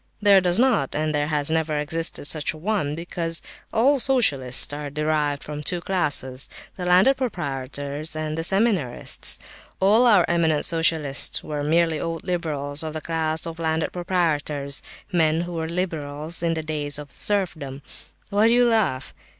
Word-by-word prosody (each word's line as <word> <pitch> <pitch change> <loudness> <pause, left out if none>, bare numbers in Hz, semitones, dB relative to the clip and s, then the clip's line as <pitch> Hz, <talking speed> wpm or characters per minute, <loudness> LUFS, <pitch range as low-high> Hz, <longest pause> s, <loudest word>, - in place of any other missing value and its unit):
There 200 -2 +5
does 180 0 +1
not, 235 - +2
and 155 +1 -1
there 145 0 0
has 150 -1 0
never 160 -1 0
existed 160 +1 -1
such 150 0 +1
a - - -11
one, 170 -4 -2
because 165 0 -2 0.3
all 270 +5 +3
socialists 145 - +3
are 145 0 -5
derived 150 -1 -1
from 150 0 -6
the - - -7
two 175 +3 -2
classes—the 150 -2 -1
landed 185 +10 +4
proprietors, 145 - -4
and 155 0 -3
the 165 - -3
seminarists. 190 - +2 0.4
All 215 +6 +4
our 205 -7 +5
eminent 165 -3 +1
socialists 160 -4 +3
are 150 -1 -4
merely 165 +1 +1
old 165 -1 -4
liberals 150 -5 -2
of 160 -1 -5
the 155 - -4
class 160 -1 -1
of 165 0 -7
landed 160 -1 -1
proprietors, 155 -6 -1 0.3
men 160 -2 +2
who 175 0 -6
were 160 -1 -3
liberals 160 -3 -3
in 165 -1 0
the 160 - -3
days 145 -2 -3
of 145 -1 -10
serfdom. 160 -9 -2 0.5
Why 205 +2 +3
do 230 - +4
you 245 0 +4
laugh? 215 - 0
160 Hz, 160 wpm, -23 LUFS, 150-180 Hz, 0.5 s, There